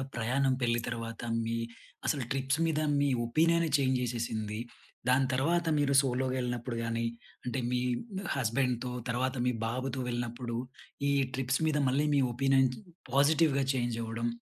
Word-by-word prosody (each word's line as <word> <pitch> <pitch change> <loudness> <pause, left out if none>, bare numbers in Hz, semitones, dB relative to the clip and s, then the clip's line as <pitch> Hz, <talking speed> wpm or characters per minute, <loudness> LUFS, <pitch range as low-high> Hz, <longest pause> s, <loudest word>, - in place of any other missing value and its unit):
ప్రయాణం 130 +3 +1
పెళ్లి 120 -1 +2
తర్వాత 115 -1 -5 0.2
మీ 115 +1 -1 0.5
అసలు 140 -4 +1
ట్రిప్స్ 135 +3 0
మీద 155 -1 +1 0.2
మీ 145 - +3 0.2
ఒపీనియన్‌ని 165 +5 +3
చేంజ్ 130 -2 +2
చేసేసింది. 110 -3 -2 0.5
దాని 130 +1 +4
తర్వాత 165 +6 +1
మీరు 140 -1 +2
సోలోగా 130 0 0
వెళ్ళినప్పుడు 120 -1 -2
కాని, 115 0 -1 0.4
అంటే 125 +2 -2
మీ 125 0 +1 0.5
హస్బెండ్‌తో 125 0 0 0.2
తర్వాత 130 +2 0
మీ 125 - +3
బాబుతో 130 +2 -2
వెళ్ళినప్పుడు 120 0 -3 0.5
ఈ - - +3 0.2
ట్రిప్స్ 130 +2 0
మీద 150 -1 +2
మళ్ళీ 140 +4 +2
మీ 140 - +4
ఒపీనియన్ 135 +1 +3 0.4
పాజిటివ్‍గా 140 0 +4
చేంజ్ 120 -2 -1
అవ్వడం. 115 +1 -2
130 Hz, 135 wpm, -31 LUFS, 120-140 Hz, 0.5 s, దాని